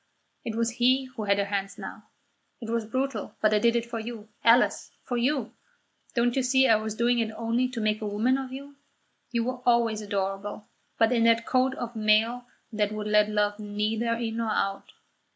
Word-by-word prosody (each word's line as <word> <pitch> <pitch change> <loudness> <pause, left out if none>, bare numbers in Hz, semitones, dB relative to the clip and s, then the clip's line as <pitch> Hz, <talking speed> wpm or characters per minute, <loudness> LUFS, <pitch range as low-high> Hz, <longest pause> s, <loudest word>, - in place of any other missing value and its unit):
It 225 - -4
was 230 0 0
he 255 +3 +3
who 215 - -4
had 200 0 +3
her 200 - +1
hands 195 -1 -3
now. - - -8 0.5
"It 225 -2 -6
was 230 -2 -1
brutal, 265 +4 -3
but 215 0 +3
I 210 - +4
did 235 +2 +3
it 235 -1 0
for 235 -1 -5
you, 220 -1 -7
Alice 235 +2 +4
for 245 - -3
you. 245 0 0 0.6
Don't 240 0 +2
you 270 - +2
see 265 +1 +4
I 220 - +5
was 215 0 -4
doing 235 +1 +2
it 225 -1 0
only 230 +3 0
to 250 -2 -6
make 215 0 0
a 215 - -2
woman 230 +6 +1
of 265 -1 -6
you? 280 +1 -9 0.5
You 235 -1 0
were 250 +1 -4
always 235 -3 +2
adorable, 200 0 -3 0.3
but 225 +1 +3
in 230 -2 +3
a 230 0 +5
coat 255 +3 +1
of 240 0 -6
mail 220 +3 +2 0.3
that 210 -1 0
would 215 0 -4
let 210 0 +3
love 210 0 0
neither 215 +3 -1
in 230 -1 -3
nor 230 -1 -1
out. 195 -2 -2
230 Hz, 205 wpm, -27 LUFS, 215-245 Hz, 0.6 s, I